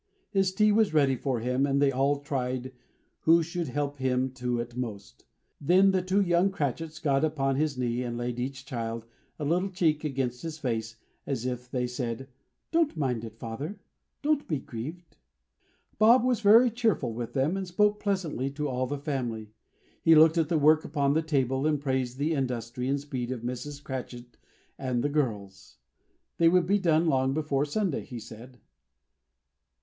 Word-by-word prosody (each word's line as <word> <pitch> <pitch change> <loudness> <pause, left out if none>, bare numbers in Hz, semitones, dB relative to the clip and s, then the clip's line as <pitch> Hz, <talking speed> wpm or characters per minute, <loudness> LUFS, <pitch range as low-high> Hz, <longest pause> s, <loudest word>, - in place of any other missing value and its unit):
His 195 -2 +2
tea 210 +3 +3
was 210 -5 +2
ready 140 -3 +4
for 125 -2 -2
him, 125 +3 +1
and 140 0 +1
they 140 -1 +4
all 140 +2 +1
tried 130 -3 -3 0.5
who 165 +1 +4
should 170 0 -3
help 145 +2 -2
him 130 0 0
to 125 -2 -2
it 120 0 -5
most. 110 -6 -6 0.4
Then 185 +6 +5
the 190 -1 +1
two 185 +3 +1
young 175 +1 +3
Cratchits 160 -2 -3
got 140 -1 +1
upon 135 -4 +1
his 150 -1 0
knees 125 0 -1
and 120 -1 -4
laid, 120 0 -3
each 135 +1 -4
child, 115 -3 -4 0.3
a 150 - -4
little 180 +6 +1
cheek 165 -5 +1
against 130 -4 -2
his 160 -2 -5
face, 115 -6 -3 0.3
as 130 -4 -2
if 125 -1 -4
they 125 -1 -1
said, 125 +1 -4 0.4
"Don't 325 - +2
mind 125 -6 -1
it, 110 -1 -9
father. 140 - -6 0.4
Don't 295 -1 +1
be 155 - 0
grieved!" 155 +7 -8 0.8
Bob 230 +3 +6
was 250 -2 +2
very 230 +4 +7
cheerful 220 - 0
with 115 0 -5
them, 140 +6 +1
and 195 -1 -3
spoke 210 +4 +2
pleasantly 175 - -1
to 150 +2 -3
all 130 -1 -1
the 145 +2 -3
family. 120 -7 -4 0.5
He 165 -1 +6
looked 160 +2 +6
at 160 -2 +1
the 165 - +2
work 155 +1 +5
upon 140 -2 0
the 160 - +2
table, 135 -3 0
and 150 -2 +1
praised 130 -3 -1
the 150 +4 0
industry 125 -3 -2
and 140 +1 +1
speed 130 -4 -4
of 125 -3 -4
Mrs. 135 +4 -5
Cratchit 125 -2 -7 0.4
and 125 -3 -1
the 145 - +1
girls. 105 -10 -3 0.6
They 165 -1 +6
would 180 0 +3
be 200 +3 +2
done 165 -3 +3
long 135 -3 +2
before 145 -2 0
Sunday, 180 +1 -1
he 125 - -8
said. 115 +3 -11
140 Hz, 180 wpm, -28 LUFS, 125-165 Hz, 0.8 s, very